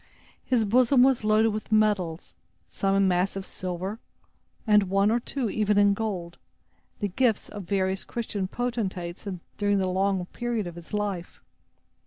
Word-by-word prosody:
His 235 Hz, -4 st, +1 dB
bosom 245 Hz, +4 st, +5 dB
was 265 Hz, -3 st, +3 dB
loaded 215 Hz, +1 st, +4 dB
with 215 Hz, 0 st, -5 dB
medals, 205 Hz, -6 st, +1 dB, 0.3 s
some 195 Hz, -, 0 dB
in 195 Hz, -1 st, +4 dB
massive 190 Hz, +2 st, 0 dB
silver, 185 Hz, +4 st, -5 dB, 0.7 s
and 210 Hz, -3 st, +4 dB
one 195 Hz, +2 st, +3 dB
or 235 Hz, -, +2 dB
two 250 Hz, +1 st, -3 dB
even 210 Hz, 0 st, +1 dB
in 205 Hz, 0 st, +5 dB
gold, 190 Hz, -5 st, -4 dB, 0.6 s
the 205 Hz, -, -1 dB
gifts 225 Hz, +3 st, +1 dB
of 205 Hz, -3 st, -7 dB
various 190 Hz, +1 st, 0 dB
Christian 210 Hz, -5 st, -3 dB
potentates 195 Hz, -6 st, -3 dB, 0.3 s
during 205 Hz, -1 st, +2 dB
the 190 Hz, -, +1 dB
long 190 Hz, 0 st, 0 dB
period 235 Hz, +1 st, -3 dB
of 175 Hz, -, -6 dB
his 170 Hz, 0 st, -12 dB
life. 205 Hz, -4 st, -3 dB
205 Hz, 150 wpm, -26 LUFS, 185-220 Hz, 0.7 s, bosom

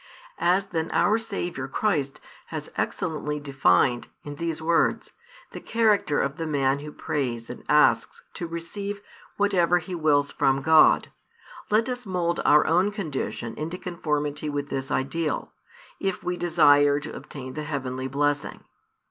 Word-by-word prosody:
As 185 Hz, +3 st, +2 dB
then 165 Hz, -4 st, -3 dB
our 215 Hz, +2 st, +3 dB
Saviour 175 Hz, -11 st, -4 dB
Christ 145 Hz, -4 st, -1 dB, 0.3 s
has -, -, -6 dB
excellently 150 Hz, -2 st, -2 dB
defined, 130 Hz, -4 st, +2 dB, 0.2 s
in 145 Hz, -, -6 dB
these 165 Hz, -1 st, -2 dB
words, 165 Hz, +1 st, +1 dB, 0.4 s
the -, -, -7 dB
character 215 Hz, -9 st, +2 dB
of 140 Hz, +1 st, -2 dB
the 165 Hz, -, -3 dB
man 140 Hz, -2 st, +1 dB
who 150 Hz, +1 st, -8 dB
prays 125 Hz, -7 st, -3 dB
and 125 Hz, -, -10 dB
asks 150 Hz, +1 st, +3 dB
to 170 Hz, -, -5 dB
receive 200 Hz, +5 st, -5 dB, 0.4 s
whatever 180 Hz, -4 st, +3 dB
he 180 Hz, +2 st, -6 dB
wills 145 Hz, -4 st, +2 dB
from 135 Hz, 0 st, +1 dB
God, 160 Hz, +1 st, +5 dB, 0.6 s
let 220 Hz, +3 st, +3 dB
us 250 Hz, -3 st, -5 dB
mould 175 Hz, -2 st, -1 dB
our 150 Hz, 0 st, +6 dB
own 180 Hz, +5 st, +3 dB
condition 150 Hz, -, -4 dB
into 165 Hz, +4 st, -5 dB
conformity 150 Hz, -4 st, -2 dB
with 145 Hz, 0 st, -3 dB
this 135 Hz, 0 st, -3 dB
ideal, 150 Hz, +3 st, -2 dB, 0.5 s
if 195 Hz, -1 st, -2 dB
we 180 Hz, -, -1 dB
desire 145 Hz, -5 st, +4 dB
to 150 Hz, +1 st, -8 dB
obtain 130 Hz, -2 st, -8 dB
the 155 Hz, -, -4 dB
heavenly 130 Hz, -3 st, -4 dB
blessing. 145 Hz, +2 st, -1 dB
155 Hz, 145 wpm, -25 LUFS, 140-175 Hz, 0.6 s, our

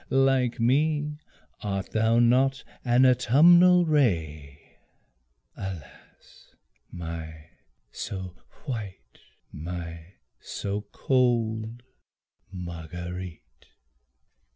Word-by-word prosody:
Like 135 Hz, -2 st, +2 dB
me, 150 Hz, +4 st, +1 dB, 0.4 s
art 100 Hz, -2 st, -3 dB
thou 110 Hz, +1 st, +2 dB
not 130 Hz, +3 st, +3 dB, 0.2 s
an 125 Hz, +1 st, +4 dB
autumnal 170 Hz, +9 st, +6 dB
ray, 80 Hz, -, -1 dB, 0.8 s
Alas 95 Hz, -7 st, -11 dB, 0.4 s
my 80 Hz, -2 st, -7 dB, 0.4 s
so 95 Hz, -2 st, -6 dB, 0.3 s
white, 110 Hz, -9 st, -7 dB, 0.3 s
my 85 Hz, +2 st, -7 dB, 0.2 s
so 100 Hz, +1 st, -5 dB
cold 120 Hz, -3 st, 0 dB, 0.7 s
Marguerite! 85 Hz, -5 st, -8 dB
110 Hz, 65 wpm, -26 LUFS, 85-130 Hz, 0.8 s, autumnal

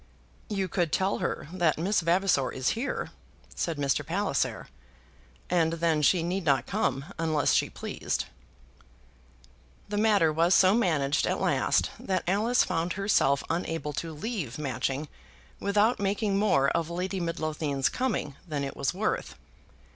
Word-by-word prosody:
"You 195 Hz, -3 st, -1 dB
could 175 Hz, -3 st, -1 dB
tell 190 Hz, +1 st, +1 dB
her 170 Hz, -4 st, -3 dB
that 175 Hz, -4 st, +2 dB
Miss 190 Hz, +6 st, +1 dB
Vavasor 170 Hz, -5 st, +2 dB
is 130 Hz, 0 st, -1 dB
here," 235 Hz, +5 st, -2 dB, 0.4 s
said 165 Hz, -3 st, -2 dB
Mr. 140 Hz, -1 st, 0 dB
Palliser. -, -, -1 dB, 0.8 s
"And 165 Hz, -2 st, +2 dB
then 165 Hz, -2 st, +1 dB
she 165 Hz, +4 st, +3 dB
need 180 Hz, +3 st, -2 dB
not 140 Hz, -5 st, +2 dB
come 135 Hz, +2 st, -1 dB
unless 155 Hz, -3 st, +2 dB
she -, -, +2 dB
pleased." -, -, -3 dB, 1.6 s
The 205 Hz, 0 st, -1 dB
matter 205 Hz, -8 st, +4 dB
was 170 Hz, +3 st, +3 dB
so 185 Hz, 0 st, +6 dB
managed 155 Hz, -11 st, +1 dB
at -, -, 0 dB
last -, -, +1 dB
that 185 Hz, -2 st, -1 dB
Alice 220 Hz, +7 st, +3 dB
found 170 Hz, -1 st, -1 dB
herself 185 Hz, -9 st, +2 dB
unable 165 Hz, -3 st, -2 dB
to 165 Hz, +3 st, -4 dB
leave 155 Hz, -, -4 dB
Matching 135 Hz, 0 st, -2 dB, 0.5 s
without 210 Hz, +4 st, +2 dB
making 200 Hz, +1 st, 0 dB
more 165 Hz, -10 st, +3 dB
of 165 Hz, -1 st, -1 dB
Lady 185 Hz, +3 st, -3 dB
Midlothian's 155 Hz, -5 st, -1 dB
coming 240 Hz, -, -2 dB
than 150 Hz, -3 st, -2 dB
it 135 Hz, -, -4 dB
was 140 Hz, +5 st, -1 dB
worth. 215 Hz, +3 st, -2 dB
170 Hz, 140 wpm, -28 LUFS, 150-195 Hz, 1.6 s, so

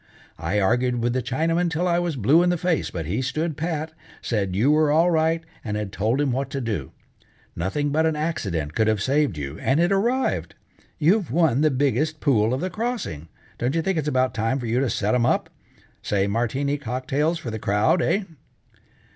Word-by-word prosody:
I 85 Hz, +6 st, 0 dB
argued 120 Hz, +4 st, +1 dB
with 120 Hz, 0 st, +1 dB
the 130 Hz, -, 0 dB
Chinaman 165 Hz, +8 st, 0 dB
'til 165 Hz, +2 st, -1 dB
I 175 Hz, 0 st, +2 dB
was 175 Hz, -3 st, -1 dB
blue 135 Hz, +8 st, +4 dB
in 175 Hz, -, +3 dB
the 175 Hz, -, +1 dB
face, 175 Hz, -1 st, 0 dB
but 85 Hz, -3 st, -5 dB
he 100 Hz, +11 st, -1 dB
stood 155 Hz, +5 st, -2 dB
pat, 160 Hz, 0 st, -3 dB, 0.3 s
said, 100 Hz, -5 st, -2 dB
you 120 Hz, +9 st, +3 dB
were 155 Hz, -1 st, +3 dB
all 165 Hz, +4 st, +4 dB
right, 165 Hz, 0 st, +1 dB, 0.2 s
and 105 Hz, -2 st, -3 dB
had 105 Hz, -2 st, -4 dB
told 115 Hz, +5 st, 0 dB
him 145 Hz, -2 st, +1 dB
what 135 Hz, +2 st, -2 dB
to 135 Hz, -, -3 dB
do. 105 Hz, -, -3 dB, 0.6 s
Nothing 140 Hz, -, -1 dB
but 160 Hz, +2 st, +2 dB
an 160 Hz, -, 0 dB
accident 95 Hz, -, -2 dB
could 110 Hz, -, +1 dB
have 110 Hz, -1 st, +2 dB
saved 140 Hz, -, +1 dB
you, 70 Hz, +1 st, -5 dB
and 135 Hz, +4 st, +1 dB
it 175 Hz, +2 st, +3 dB
arrived. 195 Hz, -, 0 dB, 0.4 s
You've 180 Hz, +4 st, +2 dB
won 150 Hz, -2 st, +2 dB
the 155 Hz, -, +4 dB
biggest 145 Hz, +3 st, 0 dB
pool 115 Hz, -6 st, +2 dB
of 130 Hz, -, -1 dB
the 185 Hz, -, -2 dB
crossing, 220 Hz, -, -4 dB, 0.3 s
don't 125 Hz, +5 st, 0 dB
you 165 Hz, -, +1 dB
think 190 Hz, -2 st, 0 dB
it's 150 Hz, -, -3 dB
about 130 Hz, -3 st, +1 dB
time 115 Hz, +4 st, 0 dB
for 125 Hz, -, -5 dB
you 115 Hz, +2 st, +1 dB
to 135 Hz, -2 st, +1 dB
set 105 Hz, 0 st, 0 dB
'em 120 Hz, -1 st, +2 dB
up? -, -, 0 dB, 0.5 s
Say 100 Hz, -1 st, 0 dB
Martini 125 Hz, +7 st, -1 dB
cocktails 135 Hz, +6 st, -1 dB
for 125 Hz, -8 st, -6 dB
the 110 Hz, -, -4 dB
crowd, 105 Hz, -, +2 dB
eh?" 200 Hz, +5 st, +1 dB
135 Hz, 205 wpm, -24 LUFS, 110-160 Hz, 0.6 s, blue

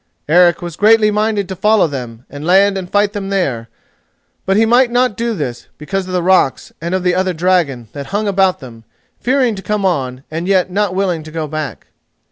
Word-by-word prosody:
Eric 175 Hz, +2 st, +4 dB
was 170 Hz, -2 st, -6 dB
greatly 215 Hz, 0 st, +4 dB
minded 210 Hz, -2 st, 0 dB
to 190 Hz, -, -5 dB
follow 210 Hz, +2 st, +3 dB
them, 125 Hz, -5 st, -6 dB
and 145 Hz, +1 st, -9 dB
land 195 Hz, +4 st, +4 dB
and 185 Hz, -2 st, -5 dB
fight 205 Hz, 0 st, +2 dB
them 200 Hz, -2 st, -4 dB
there; 135 Hz, -, -2 dB, 0.8 s
but 195 Hz, +1 st, +2 dB
he 225 Hz, -, +4 dB
might 240 Hz, +2 st, +4 dB
not 245 Hz, -2 st, +1 dB
do 230 Hz, +1 st, -2 dB
this, 125 Hz, -8 st, -5 dB
because 190 Hz, +5 st, -4 dB
of 185 Hz, -, -6 dB
the 180 Hz, -1 st, 0 dB
rocks 185 Hz, -7 st, +1 dB
and 170 Hz, +2 st, -2 dB
of 185 Hz, -, -2 dB
the 180 Hz, -1 st, +2 dB
other 185 Hz, 0 st, 0 dB
dragon, 165 Hz, -8 st, 0 dB
that 140 Hz, -2 st, -7 dB
hung 205 Hz, +2 st, -2 dB
about 190 Hz, -2 st, +1 dB
them, 115 Hz, -3 st, -12 dB, 0.4 s
fearing 255 Hz, -2 st, +1 dB
to 195 Hz, -, -7 dB
come 205 Hz, +1 st, -2 dB
on 130 Hz, -7 st, -1 dB
and 165 Hz, +3 st, -4 dB
yet 190 Hz, -2 st, +2 dB
not 200 Hz, -1 st, 0 dB
willing 185 Hz, -4 st, 0 dB
to 155 Hz, -, -11 dB
go 160 Hz, 0 st, -4 dB
back. 155 Hz, 0 st, -5 dB
185 Hz, 210 wpm, -16 LUFS, 155-205 Hz, 0.8 s, Eric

